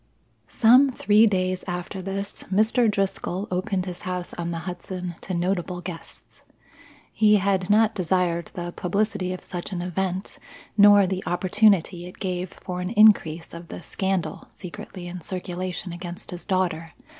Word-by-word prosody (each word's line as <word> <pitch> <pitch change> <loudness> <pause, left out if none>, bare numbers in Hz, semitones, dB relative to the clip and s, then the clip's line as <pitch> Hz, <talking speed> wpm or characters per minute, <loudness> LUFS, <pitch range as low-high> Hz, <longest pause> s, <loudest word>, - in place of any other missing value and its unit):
Some 255 +4 +6
three 215 -3 +4
days 185 -2 0
after 180 +2 -4
this 195 +2 -5
Mr. 220 +4 +3
Driscoll 195 -1 -2
opened 185 +1 -1
his 180 -1 -6
house 180 -1 -4
on 170 0 -4
the 170 - -3
Hudson 180 0 -5
to 185 - -4
notable 180 0 -1
guests. 175 -2 -9 0.7
He 210 -1 +5
had 195 -2 +1
not 220 +1 +4
desired 180 -2 0
the 175 -1 -4
publicity 185 0 -1
of 185 - -6
such 175 +2 -6
an 180 - -3
event, 185 +1 -3 0.4
nor 205 -1 +7
the 185 0 -2
opportunity 185 -1 +2
it 180 - -12
gave 185 -2 -3
for 180 -1 -6
an 180 - -2
increase 200 -7 +4
of 170 0 -9
the 175 - -8
scandal 190 -5 -2
secretly 180 0 -8
in 175 0 -7
circulation 180 +1 -4
against 175 0 -6
his 175 -1 -7
daughter. 175 -4 -1
185 Hz, 150 wpm, -25 LUFS, 175-200 Hz, 0.7 s, nor